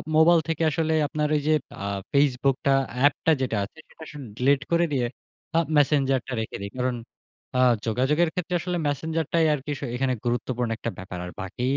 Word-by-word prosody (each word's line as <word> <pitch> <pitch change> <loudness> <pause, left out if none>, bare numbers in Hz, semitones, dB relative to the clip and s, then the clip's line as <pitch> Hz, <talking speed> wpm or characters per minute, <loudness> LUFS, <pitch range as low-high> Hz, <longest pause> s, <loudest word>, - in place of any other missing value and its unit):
Mobile 165 +1 +6
থেকে 165 0 0
আসলে 160 +2 0
আপনার 150 -1 -1
ওই 145 - +1
যে, 155 - +4 0.3
আ - - -3 0.3
Facebook 140 -1 +3
টা 140 - +4 0.3
এ্যাপটা 145 +3 +3
যেটা 120 -5 0
আছে, 110 +10 -9
সেটা 160 - -13
আসলে 150 -1 -9 0.2
ডিলিট 135 +2 +3
করে 170 0 +4
দিয়ে 125 -3 +1 0.5
আ - - +6 0.2
Messenger 135 -2 +3
টা 135 - -4
রেখে 110 - -5
দেই। 100 - -5
কারণ 125 0 0 0.6
আ - - +3 0.3
যোগাযোগের 140 +9 +2
ক্ষেত্রে 180 0 -2
আসলে 180 0 -2
Messenger 160 +3 -1
টাই 165 -1 +4
আরকি 145 +1 -4
শ - - -15
এখানে 130 0 +1
গুরুত্বপূর্ণ 120 0 -1
একটা 115 - -3
ব্যাপার 95 -1 -7
আর 90 - -7
বাকি 95 +6 -5
140 Hz, 190 wpm, -25 LUFS, 125-160 Hz, 0.6 s, Mobile